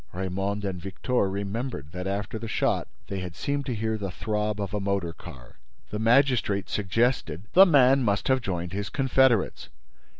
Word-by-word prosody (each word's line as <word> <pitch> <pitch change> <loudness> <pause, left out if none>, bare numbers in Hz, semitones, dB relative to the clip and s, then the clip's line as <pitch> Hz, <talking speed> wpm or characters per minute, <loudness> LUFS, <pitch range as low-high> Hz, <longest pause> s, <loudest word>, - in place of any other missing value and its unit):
Raymonde 95 +2 -2
and 95 -2 -3
Victor 100 +3 -1
remembered 100 - -4
that, 90 +2 -5
after 100 +3 -3
the 115 - -6
shot, - - 0 0.2
they 100 - -4
had 90 -2 -6
seemed 140 +7 -2
to 125 - -1
hear 110 0 -2
the 100 -2 -3
throb 105 +2 -2
of 100 0 -4
a 105 - 0
motor 100 -4 -1
car. 65 -10 -13 0.3
The 105 - -3
magistrate 115 -4 +2
suggested: 105 - 0
"The 190 +2 +9
man 135 -4 +5
must 100 -4 0
have 130 -1 +3
joined 90 -4 -3
his 100 -1 -3
confederates." 130 -4 +2
100 Hz, 170 wpm, -26 LUFS, 95-120 Hz, 0.3 s, The